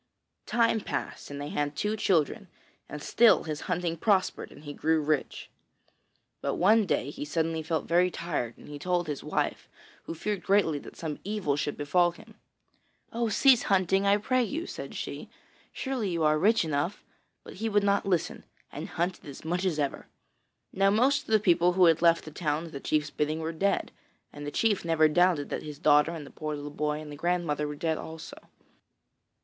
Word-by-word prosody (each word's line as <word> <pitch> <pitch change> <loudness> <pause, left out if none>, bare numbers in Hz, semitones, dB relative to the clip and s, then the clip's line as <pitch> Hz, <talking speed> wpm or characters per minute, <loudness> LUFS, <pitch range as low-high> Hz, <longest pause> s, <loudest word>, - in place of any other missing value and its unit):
Time 230 -1 +2
passed - - -5
and 145 0 -6
they 145 +1 -5
had 145 0 -2
two 210 +6 -1
children, 195 +1 +1 0.4
and 150 0 -7
still 235 -1 +5
his 155 -1 -4
hunting 175 -2 -1
prospered 190 +1 0
and - - -14
he 145 -1 -7
grew 160 +2 +1
rich. 150 -1 -1 0.9
But - - -1
one 210 +3 +4
day 140 -4 0
he - - -6
suddenly 160 +2 -1
felt 160 -1 -2
very 175 +2 +3
tired 150 -10 -4
and - - -14
he 145 0 -8
told 175 +2 0
his 150 -3 -5
wife, - - -2 0.4
who 165 - -5
feared 205 +3 -3
greatly 190 -7 +2
that - - -12
some 155 -3 -5
evil 200 -8 -1
should 145 0 -2
befall 175 +4 +2
him. 220 +4 -16 0.8
'Oh, 235 0 0
cease 255 +3 +5
hunting, 195 0 +2
I 200 +1 +5
pray 255 +5 +1
you!' 315 +9 -3
said - - -7
she. - - -6 0.4
'Surely 260 -7 -3
you 170 -2 -1
are 155 0 +3
rich 215 +2 +3
enough'; 155 +5 -2 0.4
but - - -11
he 225 +3 -2
would 205 -1 +2
not 200 0 +2
listen, 180 -4 -1 0.3
and - - -6
hunted 175 0 -3
as 140 +2 -10
much 175 +3 -1
as 175 -5 0
ever. 145 -2 -2 0.7
Now 195 +1 +3
most 255 +7 +2
of - - -25
the 220 -1 +4
people 175 -3 +3
who 185 0 +5
had 165 -1 +4
left 170 -1 +4
the 155 - -8
town 150 0 -2
at 165 - -10
the 140 - -6
chief's 150 +1 -1
bidding 150 +1 -1
were 160 +1 -3
dead, 195 +5 0 0.4
and 145 0 -7
the - - -3
chief 215 +1 +1
never 165 -2 +4
doubted 170 -2 +2
but - - -2
that - - -12
his 150 -1 -7
daughter 150 0 +4
and 160 -3 -7
the - - -13
poor 155 -1 -4
little 145 0 -7
boy 150 0 -2
and 155 -1 -9
the 145 - -8
old - - -20
grandmother 170 -4 0
were 150 - -5
dead 160 +1 -1
also. 160 0 -9
170 Hz, 200 wpm, -28 LUFS, 150-195 Hz, 0.9 s, still